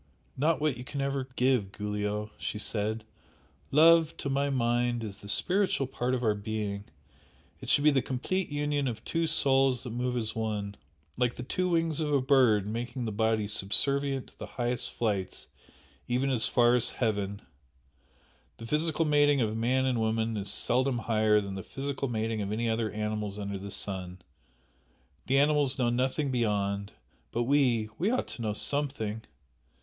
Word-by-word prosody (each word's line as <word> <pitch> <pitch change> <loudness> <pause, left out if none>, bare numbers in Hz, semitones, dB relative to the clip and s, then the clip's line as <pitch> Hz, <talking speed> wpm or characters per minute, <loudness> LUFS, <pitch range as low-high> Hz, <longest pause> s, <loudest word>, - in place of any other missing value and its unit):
"Not 155 +4 +2
what 150 -5 0
you 125 - -7
can 140 +2 -6
ever 135 -1 -1
give, 125 -6 +2
Giulio!" 105 0 -3
she - - -3
said 110 +1 -2 0.7
"Love 165 +2 +5
to 140 - -3
my 140 +1 +1
mind 120 -2 +1
is 100 -2 -6
the 100 - -9
spiritual 185 - +1
part 125 0 -1
of 125 - -3
our 110 -2 +3
being 105 -1 -4 0.7
it - - -7
should 145 - +4
be 150 - +6
the 135 -2 +2
complete 170 +10 -2
union 145 -1 -1
of 115 -2 -4
two 165 0 0
souls 135 -4 +3
that 125 - -6
move 125 +1 -1
as 110 -2 -3
one, 105 -2 -3 0.4
like 125 -1 +1
the 125 - -6
two 180 +8 -1
wings 165 -3 +1
of 150 -2 -1
a 140 - +4
bird 130 -7 +4
making 120 +3 -4
the 110 - -2
body 110 0 +1
subservient 135 +7 0
to - - -23
the - - -6
highest 125 0 -2
flights, 100 -5 -2 0.6
even 130 +3 +1
as 120 -4 +3
far 120 -1 +4
as 125 -1 +4
heaven! 100 -3 -2 1.1
The 115 - -9
physical 155 +4 +1
mating 145 -1 +4
of 110 -1 0
man 125 +4 +1
and 125 -3 +1
woman 110 0 0
is 100 -1 -2
seldom 125 +5 +1
higher 110 -2 +3
than 100 -1 -6
the 95 - -5
physical 140 +4 -4
mating 110 -2 -2
of 100 0 -3
any 115 +2 -1
other 110 -1 0
animals 105 -1 -3
under 100 -1 -4
the 100 +1 -7
sun, 95 -2 -3 1.1
the 135 - +3
animals 145 -1 +3
know 120 -2 +2
nothing 130 +3 0
beyond 100 -4 0 0.4
but 120 - 0
we 120 -5 +2
we 190 +6 +2
ought 255 - -1
to - - -8
know 110 -2 -1
something!" 110 -1 -2
120 Hz, 175 wpm, -29 LUFS, 105-140 Hz, 1.1 s, be